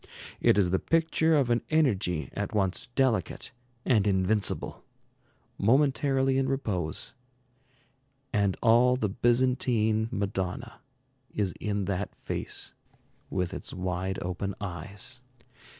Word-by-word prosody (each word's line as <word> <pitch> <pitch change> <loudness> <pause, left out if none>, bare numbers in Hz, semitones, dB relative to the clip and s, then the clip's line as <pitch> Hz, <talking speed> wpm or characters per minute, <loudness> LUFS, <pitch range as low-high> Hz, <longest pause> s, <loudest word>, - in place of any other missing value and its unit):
It - - +4
is 90 -4 +3
the 95 - +2
picture 160 0 +2
of 135 -5 +2
an 120 - +2
energy 105 - +1
at 105 +1 -3
once 95 -3 +1
delicate 120 - 0 0.3
and 105 -5 +3
invincible, 100 +2 +2 0.8
momentarily 135 +2 +3
in 135 0 0
repose; 100 - -2 1.2
and 100 -3 +1
all 120 +2 +5
the 110 -5 -1
Byzantine 120 -1 +2
Madonna 100 +4 -3 0.5
is 100 -4 0
in 105 -2 -1
that 100 +1 -3
face - - -4 0.6
with 90 -2 -2
its - - -6
wide 95 +1 -2
open 90 +2 -3
eyes. 100 +6 -5
105 Hz, 110 wpm, -28 LUFS, 95-125 Hz, 1.2 s, all